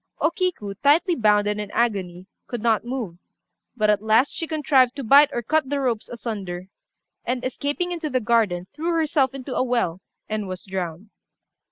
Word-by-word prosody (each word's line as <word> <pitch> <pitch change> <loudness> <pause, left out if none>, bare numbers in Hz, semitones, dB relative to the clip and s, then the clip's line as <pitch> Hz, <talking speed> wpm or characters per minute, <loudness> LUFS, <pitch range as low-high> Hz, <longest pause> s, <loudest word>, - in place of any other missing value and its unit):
O 320 - +2
Kiku, 345 - -2
tightly 325 +6 +4
bound 210 -6 +3
and 210 0 -1
in 205 - -6
agony, 190 -6 -1 0.2
could 240 -3 -5
not 225 -2 +2
move; 235 -9 -5 0.6
but 215 -2 +3
at 205 -1 +1
last 220 +5 +3
she 330 - -3
contrived 275 -5 +3
to 280 - -5
bite 280 +5 +7
or 240 -3 -3
cut 305 +3 +1
the 285 0 0
ropes 240 -5 -1
asunder, 200 -6 -5 0.5
and, 250 +1 -2
escaping 290 +7 -2
into 330 -3 -3
the 255 -2 +1
garden, 215 -6 +1
threw 330 +4 -2
herself 290 -5 +1
into 265 0 -6
a - - +1
well, 235 -9 0 0.3
and 215 -2 -3
was 185 -1 -7
drowned. 190 +1 -5
240 Hz, 180 wpm, -23 LUFS, 205-285 Hz, 0.6 s, bite